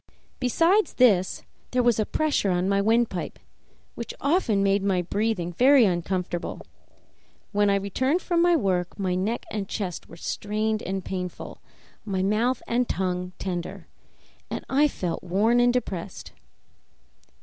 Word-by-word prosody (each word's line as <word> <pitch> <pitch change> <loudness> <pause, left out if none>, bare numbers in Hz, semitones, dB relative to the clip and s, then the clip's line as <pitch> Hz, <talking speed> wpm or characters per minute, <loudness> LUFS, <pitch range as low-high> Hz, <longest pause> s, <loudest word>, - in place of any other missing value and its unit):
Besides 335 - +2
this, 200 -8 +3 0.3
there 250 0 +1
was 240 -2 +3
a 215 - 0
pressure 300 -10 +1
on 180 0 +1
my 200 0 +2
windpipe, 225 -3 0 0.6
which 235 - -7
often 280 - +2
made 200 0 +2
my 190 -2 +1
breathing 195 -2 -1
very 255 - +6
uncomfortable; 180 -1 -2 0.9
when 205 0 +2
I 200 - +3
returned 255 - 0
from 345 -2 0
my 345 0 +5
work 185 - 0
my 190 -3 -1
neck 200 +6 -2
and 200 -3 -4
chest 185 -6 -4
were 165 - -12
strained 215 +4 -2
and 190 0 -4
painful, 180 -2 -6 0.4
my 190 -3 -2
mouth 230 +6 +1
and 240 +1 0
tongue 180 -1 -2
tender, 175 -2 -5 0.6
and - - -5
I 290 +3 +4
felt 180 - -4
worn 205 +7 +2
and 245 0 +5
depressed. 200 -8 -4
205 Hz, 140 wpm, -25 LUFS, 185-245 Hz, 0.9 s, very